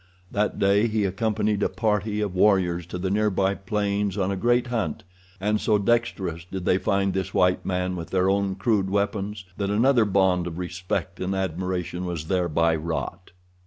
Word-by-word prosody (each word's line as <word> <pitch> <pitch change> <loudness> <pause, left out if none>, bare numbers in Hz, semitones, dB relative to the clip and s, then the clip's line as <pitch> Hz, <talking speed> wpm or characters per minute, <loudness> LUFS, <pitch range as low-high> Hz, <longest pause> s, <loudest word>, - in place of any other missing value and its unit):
That 105 +1 0
day 100 +3 +3
he 110 -2 0
accompanied 105 +1 0
a - - +2
party 105 -1 0
of 100 -3 -2
warriors 90 -3 +2
to 90 - -5
the 95 +1 -2
nearby 100 -2 +2
plains 100 0 -1
on 95 -1 0
a - - -1
great 120 +6 +2
hunt, 115 -11 -2 0.4
and 105 +2 0
so 110 -2 +3
dexterous 100 -6 0
did 90 +1 -6
they 90 - +3
find 100 +1 +1
this 95 0 -3
white 90 0 +2
man 90 0 -1
with 85 -2 -6
their 95 0 +2
own 100 0 +1
crude 100 -1 +1
weapons 100 0 -2
that 100 -1 -1
another 115 +3 +4
bond 95 -3 +2
of 85 -1 -6
respect 90 +1 -3
and 95 +1 -2
admiration 90 -1 -2
was 85 -3 -4
thereby 85 -3 +2
wrought. 85 +3 -4
95 Hz, 175 wpm, -25 LUFS, 90-105 Hz, 0.4 s, another